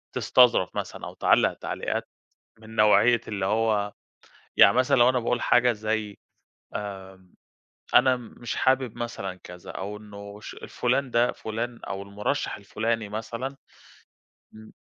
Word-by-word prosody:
تستظرف 120 -7 +4
مثلًا - - -5
أو - - -8
تعلق - - +3
تعليقات - - -4 0.5
من 110 0 -12
نوعية 110 +2 +5
اللي 100 -3 -2
هو 105 -1 +1 0.7
يعني - - +8
مثلًا 130 +2 +3
لو 120 +1 +6
أنا 130 - +2
باقول 120 +1 -1
حاجة 125 0 +4
زي 110 -1 -3 0.6
آآ 95 -2 -7 0.7
أنا 130 0 +6
مش 120 -1 -7
حابب 130 -3 +1
مثلًا 120 -6 -4
كذا 90 0 -10
أو 100 +2 -5
إنه 100 -1 -11
ش - - -9
الفلان 130 +2 -1
ده 120 +1 +3
فلان 115 +2 -5
أو 100 0 -4
المرشّح 105 +8 -2
الفلاني 110 +2 -2
مثلًا 115 +6 -5 1.0
أمم، 110 0 -13
110 Hz, 135 wpm, -26 LUFS, 100-120 Hz, 1.0 s, يعني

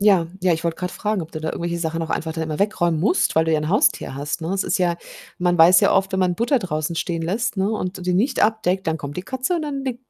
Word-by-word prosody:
Ja, 195 -5 +4
ja, 180 -1 +3
ich 160 +1 -2
wollte 165 -1 -1
grad 180 -1 -4
fragen, 210 -3 -2
ob 160 - -10
du 155 - -4
da 160 - -3
irgendwelche 170 0 -3
Sachen 165 0 -2
noch 165 - -4
einfach 160 0 -2
dann 160 0 -3
immer 155 -1 -4
wegräumen 175 -6 +1
musst, 205 - +1
weil 160 - +5
du 160 - 0
ja 155 - +3
'n 155 - -3
Haustier 190 -7 +2
hast, 145 +4 -3
ne? 160 - -4
Es 195 - 0
ist - - 0
ja 175 -2 +1 0.4
man 175 0 +1
weiß 170 +2 +7
ja - - +4
oft, 195 0 +1
wenn 190 - 0
man 180 -1 +2
Butter 245 - +1
draußen 165 -4 -3
stehen 165 -1 -2
lässt, 205 +7 -1
ne, 195 +2 +1
und 190 -3 -3
d 180 - -9
die 180 0 0
nicht 245 +9 +1
abdeckt, 195 -4 +1
dann 160 0 0
kommt 145 -1 -7
die 180 - -3
Katze 260 - -2
und 330 - -1
dann 275 -2 -4
leckt 250 -2 -4
180 Hz, 295 wpm, -22 LUFS, 165-205 Hz, 0.4 s, weiß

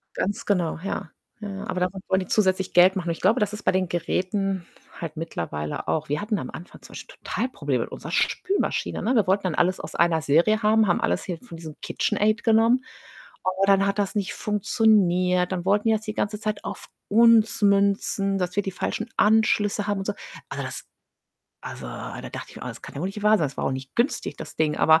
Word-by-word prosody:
Ganz 205 +4 -2
genau, 175 -6 0
ja, 190 -4 -4 0.3
ja, 205 - -5
ja. 195 +2 -6
Aber 180 - -2
damit 185 +1 -1
wollen 190 0 +2
die 185 - -6
zusätzlich 190 -3 +1
Geld 185 +2 +6
machen 175 -2 -2
und - - +2
ich 165 - -5
glaube, 220 +7 +3
das 210 0 +1
ist 210 - -6
bei - - +2
den 185 -2 0
Geräten 185 +1 -1 0.3
halt 165 -2 -6
mittlerweile 80 - -4
auch. 155 -1 0
Wir 145 +7 -1
hatten 210 -1 -1
am 130 - -6
Anfang 175 - -10
zum - - -14
Beispiel - - -10
total 250 +3 -2
Probleme - - -1
mit - - -10
unserer - - -7
Spülmaschine, 390 +2 0
ne? 245 - +1
Wir 215 -6 +3
wollten 195 +1 +2
dann 180 -4 -1
alles 185 +2 +1
aus - - -8
einer 170 -2 +2
Serie 175 +10 +3
haben, 215 0 +4
haben 175 - +2
alles 85 +1 0
hier 175 -3 -4
von 170 -7 -11
diesem 155 -2 -9
KitchenAid 215 +2 0
genommen, 230 +3 +4 0.6
aber 190 +1 +1
dann 195 0 +4
hat 200 +1 -1
das 200 +2 -1
nicht 200 -2 -1
funktioniert, 185 -4 +2
dann 180 -1 -3
wollten 205 +3 +2
die 220 - +5
das 215 - -3
die 215 -1 -4
ganze 210 0 -2
Zeit 215 -1 -3
auf - - -7 0.2
uns 225 0 +5
münzen, 200 -1 +2
dass 180 0 -2
wir 205 - +1
die 195 - -3
falschen - - -3
Anschlüsse 210 -1 +3
haben 205 -1 0
und 195 - -5
so. 205 - 0 0.4
Also, - - -4
das - - -6 0.8
also 65 - -7
da - - -7
dachte - - -7
ich - - -15
mir: - - -9
„Oh, - - -6
das - - -9
kann - - -10
ja - - -4
wohl 180 - -1
nicht 205 +1 -7
wahr 210 0 +5
sein.“ 155 - +1
Das - - -13
war - - -2
auch - - +1
nicht 130 0 -7
günstig, 245 +5 0
das - - -9
Ding, 155 -1 +1
aber 160 +1 +5
195 Hz, 235 wpm, -24 LUFS, 175-210 Hz, 0.8 s, Geld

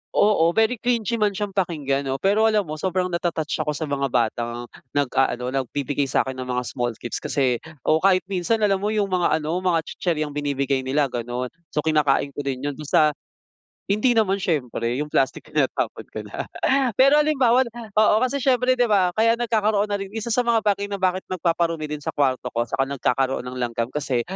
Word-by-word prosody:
Oo, 185 -6 +4
very 225 +1 +2
cringy 235 -1 0
man 205 -2 +1
siyang 205 0 -3
pakinggan 150 -8 -1
'no, 135 - -1
pero 205 +8 +3
alam 215 -2 +2
mo 155 -2 -7
sobrang 185 +1 -1
nata-touch 170 -2 -2
ako 150 -1 0
sa 160 - -4
mga 140 -2 -1
batang 120 -1 -1 0.3
nag-aano, 130 -2 +1
nagbibigay 140 +2 -1
sa'kin 130 0 0
ng 130 - -5
mga 125 0 -1
small 120 -1 -3
gifts, 120 - -5
kasi 130 -4 0 0.2
o 155 +1 +3
kahit 185 0 +3
minsan 210 +4 0
alam 195 -2 +3
mo 205 - -2
yung 210 -2 0
mga 175 -4 +2
ano, 160 +4 -1
mga 175 -3 +1
tsitsiryang 155 -5 -2
binibigay 140 -2 0
nila 135 +1 0
ganon, 120 +1 -4 0.2
so 150 - 0
kinakain 145 -3 +2
ko 140 - -9
din 135 -1 -3
yun 145 -1 -2
basta 150 0 +3 0.7
hindi 215 +5 +1
naman 200 -3 +2
siyempre, 125 -9 -1
yung 150 +2 -3
plastic 135 -1 +1
tinatapon - - -2
ka - - -7
na. - - -6 0.5
Pero 275 +6 +5
halimbawa 265 -5 +3 0.3
oo, 215 -1 +5
kasi 255 +2 +1
siyempre 255 -1 +2
di 245 - +4
ba 200 -5 +3
kaya 230 +1 +4
nagkakaroon 215 -3 +1
na 205 - 0
rin, 195 +1 -7
isa 225 +1 -4
sa 245 +2 +1
mga 230 -2 +3
bagay 205 -1 +1
na 200 -1 -5
bakit 185 0 0
nagpaparumi 165 -3 -1
din 150 - -3
sa - - -2
kwarto 130 -3 0
ko, 120 -1 -1
saka 135 - 0
nagkakaroon 135 -1 0
ng 125 +1 -7
langgam 120 -1 -2
kasi, 135 -4 -1
160 Hz, 190 wpm, -23 LUFS, 135-210 Hz, 0.7 s, Pero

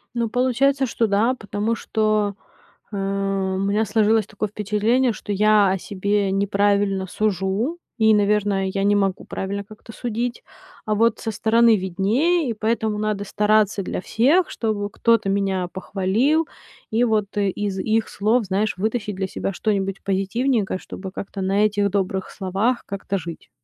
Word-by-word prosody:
Ну, 235 -1 0
получается, 260 +3 +2
что 230 -1 0
да, 215 +5 +2
потому 215 -1 -2
что, 215 -2 0 0.6
э, - - -4
у 195 -1 -1
меня 200 +3 +1
сложилось 220 0 +2
такое 215 0 -4
впечатление, 215 +4 +1
что 210 - -6
я 210 0 +4
о 190 - 0
себе 200 +1 -1
неправильно 200 -1 +1
сужу 210 - -1 0.2
и, 220 -1 +5
наверно, 205 -2 +2
я 195 +1 -2
не 205 0 +4
могу 195 -2 0
правильно 200 +1 -4
как-то 215 +2 -13
судить. 240 0 -3 0.4
А 215 - +1
вот 230 +2 +2
со 225 - -3
стороны 225 +2 +4
виднее, 230 - +1
и - - 0
поэтому 215 -1 -1
надо 210 -1 -1
стараться 210 0 +2
для 180 - -4
всех, 285 - +2
чтобы 210 -3 -2
кто-то 230 -3 +2
меня 195 -2 0
похвалил, 210 - 0 0.4
и 235 +2 +2
вот 215 -2 0
из 200 -1 -1
их 220 +2 0
слов, 220 +4 +1
знаешь, 195 +2 0
вытащить 210 +1 -2
для 190 0 -2
себя 195 - -3
что-нибудь 195 -2 -1
позитивненькое, 195 +2 0
чтобы 190 0 -8
как-то 195 -1 -6
на 195 +2 +2
этих 205 -1 +1
добрых 190 -1 -1
словах 200 +6 -1
как-то 200 0 -3
жить. 170 -1 -8
205 Hz, 150 wpm, -22 LUFS, 195-225 Hz, 0.6 s, и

